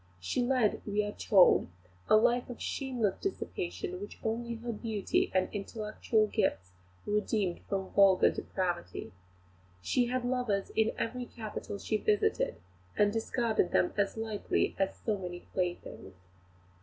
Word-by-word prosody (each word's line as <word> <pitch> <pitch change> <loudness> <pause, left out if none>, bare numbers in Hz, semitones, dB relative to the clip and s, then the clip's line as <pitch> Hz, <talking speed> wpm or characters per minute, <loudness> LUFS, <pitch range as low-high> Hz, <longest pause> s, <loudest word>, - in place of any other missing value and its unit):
She 90 - -1
led, 245 -3 +2
we 210 0 0
are 205 - -3
told, 195 -3 +5 0.4
a - - +7
life 240 +3 +3
of 245 - -7
shameless 250 -8 -1
dissipation, 180 - -4
which 205 - -8
only 235 +1 -2
her 235 +1 -4
beauty 215 -2 -1
and 185 0 +2
intellectual 215 +1 0
gifts 95 - -1 0.3
redeemed 210 -3 0
from 190 -1 -2
vulgar 195 -2 +6
depravity. 175 - -3 0.7
She 245 - +2
had 250 0 -1
lovers 245 -6 0
in 220 0 +3
every 245 +2 -2
capital 215 -3 -6
she 215 +2 -1
visited, 210 0 +1 0.4
and 205 0 +4
discarded 225 -4 0
them 180 - +3
as 200 +1 0
lightly 220 -2 -1
as 195 0 +1
so 210 -3 -1
many 175 -1 -6
playthings. 175 - -3
210 Hz, 135 wpm, -31 LUFS, 195-230 Hz, 0.7 s, a